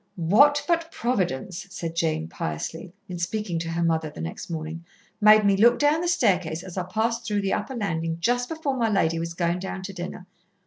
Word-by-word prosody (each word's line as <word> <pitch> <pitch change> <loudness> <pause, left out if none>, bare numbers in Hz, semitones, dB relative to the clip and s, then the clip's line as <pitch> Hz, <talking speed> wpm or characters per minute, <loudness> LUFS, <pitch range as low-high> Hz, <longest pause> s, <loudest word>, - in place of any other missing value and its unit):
"What 280 - +4
but 335 -1 +1
Providence," 185 - -2
said 170 -2 -5
Jane 160 - 0
piously, 80 - -5 0.2
in 180 -2 -6
speaking 175 -1 -2
to 165 0 -4
her 170 +1 -1
mother 160 -1 +1
the - - -12
next 80 - -6
morning, 160 0 -5 0.4
"made 215 0 +7
me 200 -1 +5
look 235 +4 +5
down 295 +2 +3
the 350 - -1
staircase 185 - +1
as 185 -2 -9
I 185 -2 -2
passed 230 +3 0
through 205 -2 -1
the 195 -1 0
upper 210 +6 -3
landing 165 -7 -2
just 245 +6 +1
before 315 -4 -2
my 230 -3 +1
lady 165 -5 +1
was 165 0 -4
going 170 +1 0
down 190 0 -5
to 195 +1 -6
dinner. 180 0 -6
185 Hz, 205 wpm, -25 LUFS, 165-230 Hz, 0.4 s, made